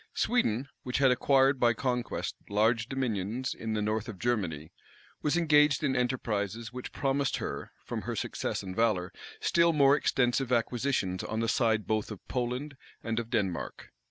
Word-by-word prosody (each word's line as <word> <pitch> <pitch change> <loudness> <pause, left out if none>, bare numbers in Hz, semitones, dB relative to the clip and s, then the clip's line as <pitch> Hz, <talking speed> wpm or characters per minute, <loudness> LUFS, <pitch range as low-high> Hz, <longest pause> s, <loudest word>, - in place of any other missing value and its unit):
Sweden, 140 - +1
which 125 - -2
had 135 -2 +5
acquired 135 +1 +3
by 120 -1 +4
conquest 125 +1 -2 0.2
large 110 +3 +2
dominions 120 -2 -2
in 110 -1 -4
the 105 -1 0
north 110 +2 -1
of 105 - -7
Germany, 90 -10 -2 0.5
was 150 +3 +1
engaged 150 -3 +4
in 135 -3 +1
enterprises 115 -3 -1
which 125 0 -6
promised 135 0 0
her, - - -5
from - - -4
her - - -4
success - - -3
and 95 -1 -6
valor, 105 -5 +1 0.3
still 170 0 +3
more 140 -2 +5
extensive 130 -2 +1
acquisitions 115 -5 0
on 110 - -3
the 115 - 0
side 110 -2 +2
both 110 -1 -1
of 105 -4 -9
Poland 130 +3 -3 0.3
and 115 0 -1
of 115 -1 -5
Denmark. 100 -7 -2
120 Hz, 160 wpm, -30 LUFS, 110-135 Hz, 0.5 s, had